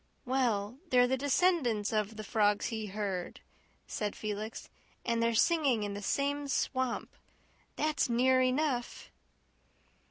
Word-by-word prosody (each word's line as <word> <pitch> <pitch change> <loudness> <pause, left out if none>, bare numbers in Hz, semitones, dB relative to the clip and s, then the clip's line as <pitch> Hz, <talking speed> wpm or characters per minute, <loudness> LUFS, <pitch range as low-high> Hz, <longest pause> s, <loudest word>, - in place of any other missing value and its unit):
"Well, 245 -3 0
they're 250 -2 +5
the 255 +1 +1
descendants 265 - +1
of 215 0 0
the 215 - -6
frogs 205 0 +1
he 220 -1 -3
heard," 195 -3 -4 0.5
said 210 -1 -3
Felix, 215 +1 -5 0.4
"and 235 -1 +1
they're 230 0 +2
singing 275 -5 +3
in 205 -1 -3
the 205 - -5
same 285 +6 -1
swamp. 260 -2 -1 0.6
That's 305 -4 0
near 255 +2 +4
enough." 255 -1 -1
235 Hz, 125 wpm, -31 LUFS, 210-265 Hz, 0.6 s, they're